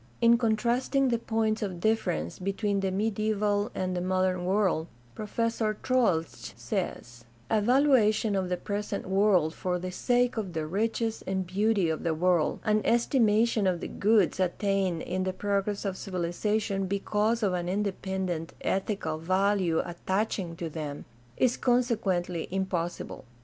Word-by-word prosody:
In 235 0 +5
contrasting 245 +4 +1
the 235 -1 +1
points 220 -1 0
of 190 -4 -3
difference 170 - 0
between 195 +2 -1
the 195 0 0
medi 215 +2 0
aeval 205 0 0
and 185 -1 -2
the 180 - -1
modern 185 0 0
world 185 -4 +1 0.3
Professor 220 - -1
Troeltsch 225 -11 0
says: 120 -1 -4 0.3
A 215 - +3
valuation 230 -4 +3
of 190 -2 -1
the 180 - 0
present 205 +1 -4
world 190 -5 +3
for 180 0 -2
the 185 +1 -5
sake 245 +5 +1
of 195 -5 -3
the 160 -1 -2
riches 225 +6 -1
and 190 -1 -1
beauty 200 +1 +1
of 160 -1 -2
the 165 -2 0
world, 175 -1 +1
an 215 0 +2
estimation 230 -3 +3
of 180 -2 +1
the - - -5
goods 205 -3 +2
attained 190 -1 0
iriT 185 +1 -2
the 185 - -1
progress 200 +1 -1
of 195 -2 -1
civilization 195 +3 -1
because 210 +4 0
of 195 -3 +2
an 175 -1 -2
independent 190 -4 -2
ethical 190 -5 -1
value 185 0 +1
attaching 190 0 -2
to 170 -1 -4
them, 150 -2 -6 0.3
is 250 -1 +2
consequently 205 -9 0
impossible. 180 -2 -3
195 Hz, 145 wpm, -28 LUFS, 180-220 Hz, 0.3 s, In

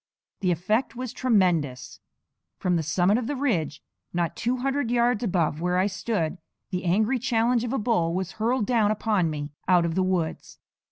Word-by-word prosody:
The 185 - 0
effect 210 +10 0
was 250 -1 -5
tremendous. 170 - +1 0.6
From 180 -1 0
the 165 - +1
summit 175 +7 +2
of 240 - -4
the 290 - -2
ridge, 195 - -1 0.3
not 170 -1 -1
two 245 +2 -1
hundred 270 0 -1
yards 240 -1 +2
above 170 -7 0
where 180 +1 +1
I 185 - +3
stood, 190 -4 -2 0.3
the 185 0 -3
angry 215 +8 +2
challenge 235 0 +1
of 240 - -3
a 270 - 0
bull 205 -8 +1
was 185 0 -2
hurled 235 0 +1
down 225 -3 +2
upon 210 -5 +1
me 150 -1 -5 0.2
out 175 -2 +4
of 165 - -1
the 190 - +1
woods. 185 -4 -2
195 Hz, 180 wpm, -26 LUFS, 170-235 Hz, 0.6 s, out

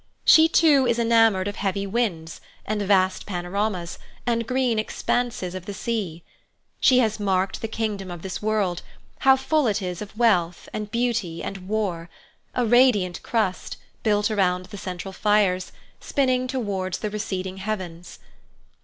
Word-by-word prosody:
She 320 0 +7
too 295 -6 +4
is 235 -1 +2
enamoured 225 -4 +3
of 205 - -5
heavy 200 0 -1
winds, 190 -7 -2 0.2
and 215 0 -2
vast 190 -2 +2
panoramas, 180 -1 -3 0.3
and 230 -1 0
green 250 -3 +1
expanses 220 -4 -2
of 185 -1 -7
the 205 - -5
sea. 190 -7 -3 0.6
She 255 - +5
has 220 -3 +2
marked 190 -1 0
the 225 - -2
kingdom 215 -4 -3
of 175 -2 -8
this 190 -1 -5
world, 210 -5 0 0.4
how 265 0 +6
full 275 +1 +1
it 215 -1 +1
is 180 -2 -5
of 210 +1 -9
wealth, 180 -8 +2
and 210 -1 -4
beauty, 230 -7 -1
and 190 -2 -6
war—a 200 +3 -4
radiant 220 -7 +3
crust, 215 -6 -2 0.2
built 210 -1 +1
around 185 -3 +1
the 185 - -11
central 185 0 -6
fires, 200 -3 +1 0.3
spinning 255 -2 0
towards 200 -8 -2
the 215 - -4
receding 190 -3 -4
heavens. 185 -4 -5
205 Hz, 145 wpm, -24 LUFS, 185-230 Hz, 0.6 s, She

